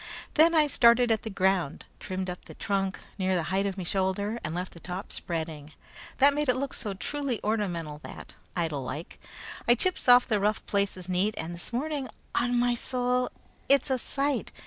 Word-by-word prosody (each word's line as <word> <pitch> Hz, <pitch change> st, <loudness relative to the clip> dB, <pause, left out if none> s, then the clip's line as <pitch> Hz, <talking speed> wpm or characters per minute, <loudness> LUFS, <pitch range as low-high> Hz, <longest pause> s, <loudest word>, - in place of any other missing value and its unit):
Then 330 Hz, +2 st, +5 dB
I 310 Hz, -1 st, +6 dB
started 240 Hz, -3 st, +5 dB
at 220 Hz, -, +2 dB
the 220 Hz, -, -5 dB
ground, 190 Hz, -6 st, 0 dB
trimmed 185 Hz, 0 st, -4 dB
up 180 Hz, 0 st, -6 dB
the -, -, -11 dB
trunk 195 Hz, -2 st, -1 dB, 0.2 s
near 190 Hz, 0 st, +1 dB
the 175 Hz, -, +1 dB
height 195 Hz, +1 st, +2 dB
of 195 Hz, -1 st, -4 dB
me 185 Hz, -, -3 dB
shoulder, 195 Hz, +5 st, -1 dB
and 160 Hz, 0 st, -3 dB
left 180 Hz, +1 st, -4 dB
the 170 Hz, -, -11 dB
top 180 Hz, +4 st, -6 dB
spreading. 160 Hz, -3 st, -4 dB, 0.4 s
That 280 Hz, +1 st, +6 dB
made 295 Hz, -1 st, 0 dB
it 250 Hz, -, +5 dB
look 270 Hz, +1 st, -3 dB
so 205 Hz, -5 st, -4 dB
truly 270 Hz, +5 st, -2 dB
ornamental 175 Hz, -8 st, -1 dB
that, -, -, -9 dB, 0.2 s
idle 160 Hz, -5 st, -1 dB
like, 140 Hz, +6 st, -6 dB, 0.5 s
I 240 Hz, -, +7 dB
chips 360 Hz, 0 st, +1 dB
off 245 Hz, 0 st, +8 dB
the 215 Hz, -3 st, +2 dB
rough 210 Hz, +2 st, 0 dB
places 200 Hz, -3 st, -1 dB
neat, 185 Hz, +4 st, +1 dB
and 165 Hz, +2 st, -4 dB
this 170 Hz, +6 st, -7 dB
morning, 280 Hz, +2 st, -2 dB, 0.2 s
on 245 Hz, 0 st, +2 dB
me 245 Hz, 0 st, +2 dB
soul, 250 Hz, +1 st, 0 dB, 0.4 s
it's 275 Hz, 0 st, +4 dB
a 260 Hz, -, +2 dB
sight! 280 Hz, +3 st, -1 dB
205 Hz, 190 wpm, -28 LUFS, 180-250 Hz, 0.5 s, off